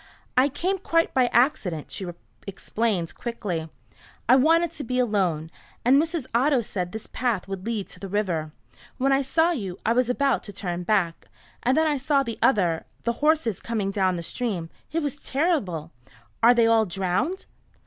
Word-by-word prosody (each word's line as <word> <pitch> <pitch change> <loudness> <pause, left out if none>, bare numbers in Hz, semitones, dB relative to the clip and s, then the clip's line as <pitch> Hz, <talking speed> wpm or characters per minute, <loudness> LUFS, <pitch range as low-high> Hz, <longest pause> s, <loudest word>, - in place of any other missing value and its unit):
"I 260 +3 +5
came 370 +7 -1
quite 330 -2 +1
by 255 -2 +4
accident," 220 - +1
she 190 - -3 0.4
explained 195 -2 -2
quickly. 185 -9 -4 0.6
"I 250 - +7
wanted 325 +5 +4
to 300 - -7
be 250 0 -2
alone, 185 -10 0 0.3
and 270 +4 +6
Mrs. 325 -3 -2
Otto 260 +2 +3
said 180 -5 -4
this 220 +2 -7
path 235 -8 -2
would 195 +1 -6
lead 220 -4 -2
to 180 - -12
the 195 - -6
river. 180 -6 -1 0.5
When 270 +2 +2
I 270 0 +4
saw 320 +5 +2
you 195 - -4
I 225 - +3
was 250 0 +2
about 275 0 +2
to 205 - -7
turn 180 -2 -3
back. 175 -3 0 0.3
And 255 +4 +2
then 320 - +4
I 300 -2 +1
saw 275 +1 +2
the 230 -3 -6
other 175 -9 +2 0.2
the 235 - +1
horses 300 - +2
coming 215 -4 -2
down 190 -2 +1
the 170 - -4
stream. 185 -5 -3 0.2
It 325 0 -1
was 290 -1 -2
terrible. 260 - -1 0.5
Are 240 +2 +7
they 235 -1 +5
all 225 -1 +4
drowned?" 195 - -1
230 Hz, 180 wpm, -25 LUFS, 185-275 Hz, 0.6 s, I